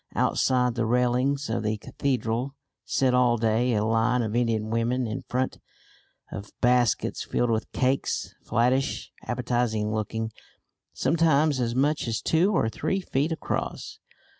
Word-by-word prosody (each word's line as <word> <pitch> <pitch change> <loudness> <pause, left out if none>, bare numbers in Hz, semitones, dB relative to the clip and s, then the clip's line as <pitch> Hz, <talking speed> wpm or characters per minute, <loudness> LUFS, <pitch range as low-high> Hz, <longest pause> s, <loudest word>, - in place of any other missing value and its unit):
Outside 125 -2 +2
the 115 -1 -1
railings 125 +4 +1
of 115 - -1
the 110 0 -1
cathedral 125 +2 -2 0.3
sit 130 -2 +1
all 125 -1 +4
day 115 +2 +1
a 105 0 +1
line 115 +2 +2
of 110 0 -3
Indian 115 -3 0
women 120 +2 0
in 110 +2 -4
front 130 +1 -1 0.7
of 100 +1 -9
baskets 125 -1 +2
filled 120 -1 0
with 110 -1 -2
cakes, 130 +1 0
flattish, 125 +3 0 0.2
appetising 120 -3 0
looking, 110 +1 -2 0.6
sometimes 155 -1 +2
as 120 -1 -1
much 145 +1 +1
as 115 -1 -1
two 170 +5 +2
or 170 - +2
three 155 +11 -1
feet 150 -3 -1
across. 160 - -4
125 Hz, 140 wpm, -26 LUFS, 115-130 Hz, 0.7 s, all